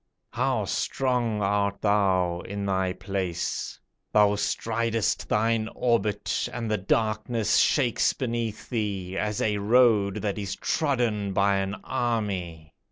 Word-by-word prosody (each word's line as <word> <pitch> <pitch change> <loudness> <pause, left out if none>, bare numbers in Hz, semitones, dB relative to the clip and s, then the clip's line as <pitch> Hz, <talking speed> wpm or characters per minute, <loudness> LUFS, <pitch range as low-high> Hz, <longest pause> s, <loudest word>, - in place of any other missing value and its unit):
How - - 0
strong 120 -5 0
art 100 0 0
thou 95 -4 +2
in 100 +2 -5
thy 95 -1 0
place! 95 -2 -3 0.3
Thou 105 -1 +5
stridest 115 +1 -1
thine 110 +1 +1
orbit, 110 -4 0
And 115 -3 -4
the 105 - +1
darkness 110 +3 +1
shakes 125 -6 +3
beneath 115 -4 -3
thee, 100 -6 -3
As 105 +1 -1
a 105 -1 +1
road 105 -2 +4
that 105 0 -1
is 100 -2 -3
trodden 120 -9 0
by 100 +1 +3
an 95 +1 -2
army. 100 - -2
105 Hz, 120 wpm, -26 LUFS, 100-115 Hz, 0.3 s, Thou